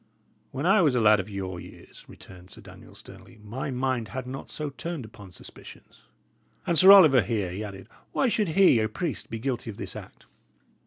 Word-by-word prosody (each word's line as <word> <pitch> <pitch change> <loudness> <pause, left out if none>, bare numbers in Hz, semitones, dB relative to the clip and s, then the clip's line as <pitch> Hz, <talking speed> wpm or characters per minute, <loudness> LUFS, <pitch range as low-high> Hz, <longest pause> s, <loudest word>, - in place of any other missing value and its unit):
"When 135 +4 -5
I 195 +2 +4
was 145 -6 +2
lad 105 -3 +4
of 95 +2 -5
your 95 -3 -6
years," - - -14
returned 90 -1 -15
Sir - - -14
Daniel, - - -15
sternly, - - -15
"my 120 +7 -6
mind 130 -3 -2
had 130 +3 -6
not 130 +2 -8
so 150 -2 -6
turned 140 +1 -6
upon 105 -3 -14
suspicions. - - -16 0.6
And 170 - 0
Sir 185 +5 +8
Oliver 155 -10 +7
here," 105 -7 -3
he 100 +4 -6
added, 100 -2 -9 0.2
"why 270 - +1
should 215 -5 0
he, 190 -11 +5
a 110 0 -1
priest, 170 -6 -5
be 115 - -5
guilty 120 0 -4
of 105 - -8
this - - -8
act?" - - -12
125 Hz, 195 wpm, -26 LUFS, 105-150 Hz, 0.6 s, Sir